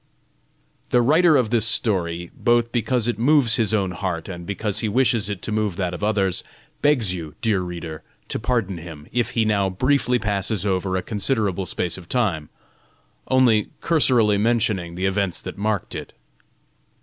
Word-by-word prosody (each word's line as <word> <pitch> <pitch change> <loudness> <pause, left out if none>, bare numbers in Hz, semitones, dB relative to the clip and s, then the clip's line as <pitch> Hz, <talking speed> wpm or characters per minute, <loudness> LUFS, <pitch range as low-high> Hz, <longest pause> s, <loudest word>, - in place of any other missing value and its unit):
The 125 - +4
writer 155 +4 +5
of 115 -4 0
this 115 -2 +3
story, 85 -7 0
both 120 0 +2
because 120 -1 0
it 120 -3 -1
moves 130 -2 +3
his 110 -3 +1
own 100 -4 +1
heart, 90 -2 -4
and 85 -2 -7
because 100 0 -2
he 110 - -1
wishes 115 -3 +2
it 100 -3 -5
to - - -3
move 105 -3 0
that 90 -2 -2
of 90 - -6
others, 100 -3 0 0.4
begs 125 -11 +2
you, 80 -4 -7
dear 105 -5 +2
reader, 85 -3 -6 0.3
to - - -2
pardon 110 -6 -1
him, 80 -3 -10
if 120 -1 0
he 110 - +3
now 100 -3 +1
briefly 125 +5 +1
passes 100 -2 -2
over 95 -1 0
a 95 - -3
considerable 100 -3 -1
space 90 +1 -2
of 85 -2 -15
time, 95 -12 0 0.8
only 125 -5 +3
cursorily 120 -10 +3
mentioning 105 -6 0
the 95 +2 -2
events 95 -2 0
that - - -7
marked 105 -3 -1
it. - - -7
105 Hz, 170 wpm, -22 LUFS, 95-120 Hz, 0.8 s, writer